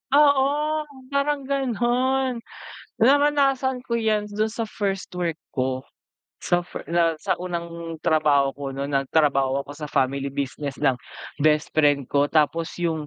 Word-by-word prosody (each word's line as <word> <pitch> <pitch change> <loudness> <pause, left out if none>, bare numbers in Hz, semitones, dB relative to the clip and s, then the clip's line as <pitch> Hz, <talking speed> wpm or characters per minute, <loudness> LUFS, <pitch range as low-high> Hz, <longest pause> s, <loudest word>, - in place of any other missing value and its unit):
Oo, 295 +2 +3 0.2
parang 280 0 0
gano'n, 260 -1 0 0.6
naranasan 275 0 +3
ko 235 - -1
'yan 215 -2 +1
dun 215 +1 -1
sa 225 +1 -3
first 195 -3 -3
work 170 -3 -2 0.2
ko. 130 0 -2 0.6
Sa 175 0 +1
fi - - -7
na 170 -1 +3
sa - - 0
unang 170 -2 -5
trabaho 150 -3 +3
ko 135 -1 -6
nun 140 +1 -3
nagtrabaho 140 -1 +2
ako 140 - -13
sa 150 - -5
family 135 0 0
business 140 0 -3
ng 135 -4 +3 0.4
bestfriend 150 -2 +2
ko, 145 0 +3
tapos 160 +2 +1
yung 160 -3 -1
170 Hz, 135 wpm, -24 LUFS, -, 0.6 s, Oo